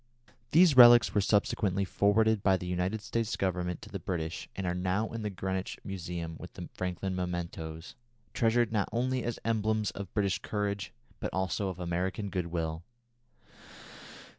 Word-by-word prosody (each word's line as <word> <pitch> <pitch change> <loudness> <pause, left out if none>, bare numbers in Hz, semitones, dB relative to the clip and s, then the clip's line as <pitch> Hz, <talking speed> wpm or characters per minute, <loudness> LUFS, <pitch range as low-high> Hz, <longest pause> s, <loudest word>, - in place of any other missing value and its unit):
These 165 0 +6
relics 120 -3 +9
were 105 - +3
subsequently 100 -1 +1
forwarded 105 +3 +3
by 95 -2 +4
the 90 - -7
United 90 +4 -1
States 115 0 -1
Government 90 -2 -2
to 105 - -10
the 100 -2 -5
British 85 -1 -4
and 95 - -3
are 90 - 0
now 95 +4 0
in 115 - -4
the 105 - -2
Greenwich 95 -1 -3
Museum 85 -3 -5
with - - -10
the - - -8
Franklin 90 +1 -3
mementoes, 85 -2 -4 0.4
treasured 115 0 +2
not 105 -3 0
only 125 +1 0
as 120 -1 -2
emblems 110 -1 +1
of 100 -2 -7
British 100 -3 +1
courage 100 -2 -3 0.3
but - - -3
also 95 +1 -1
of 90 -1 -6
American 90 +3 -2
good 90 -3 -2
will. 80 -1 -3
95 Hz, 160 wpm, -30 LUFS, 90-110 Hz, 0.4 s, relics